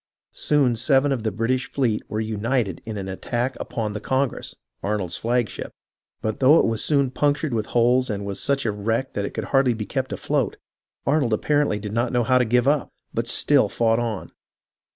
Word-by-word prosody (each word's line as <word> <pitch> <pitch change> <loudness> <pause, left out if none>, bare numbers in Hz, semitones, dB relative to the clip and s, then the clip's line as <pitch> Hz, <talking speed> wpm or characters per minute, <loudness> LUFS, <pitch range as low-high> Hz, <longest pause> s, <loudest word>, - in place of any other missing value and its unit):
Soon 140 -5 +2
seven 135 +4 +3
of 130 -4 0
the 110 - 0
British 115 +4 -1
fleet 120 -6 0
were 105 - -2
united 110 -2 -1
in 110 -2 -5
an 95 -1 -5
attack 120 +7 -2
upon 110 -3 -3
the 105 - -4
Congress 130 +2 -2 0.3
(Arnold's 100 -4 -2
"flag 120 0 0
ship"), - - -7 0.5
but 110 -1 -2
though 140 +5 +6
it - - +4
was 115 -1 -1
soon 140 -4 +2
punctured 145 0 0
with 110 -2 -1
holes 125 +2 +3
and 100 -2 -3
was 100 -1 -4
such 140 -2 0
a 110 - +2
wreck 115 +6 -2
that 100 - -2
it - - -6
could 110 - -2
hardly 135 -3 +4
be 110 -1 -4
kept 130 +2 -3
afloat, - - -1 0.5
Arnold 140 -5 +2
apparently 145 0 +1
did 105 0 -6
not 120 +2 0
know 120 -1 +2
how 130 +2 +3
to 125 - +3
give 125 +3 +2
up, 145 -1 +2 0.2
but 115 +1 -1
still 130 -2 +3
fought 115 0 +2
on. 115 -4 -3
120 Hz, 200 wpm, -23 LUFS, 110-135 Hz, 0.5 s, though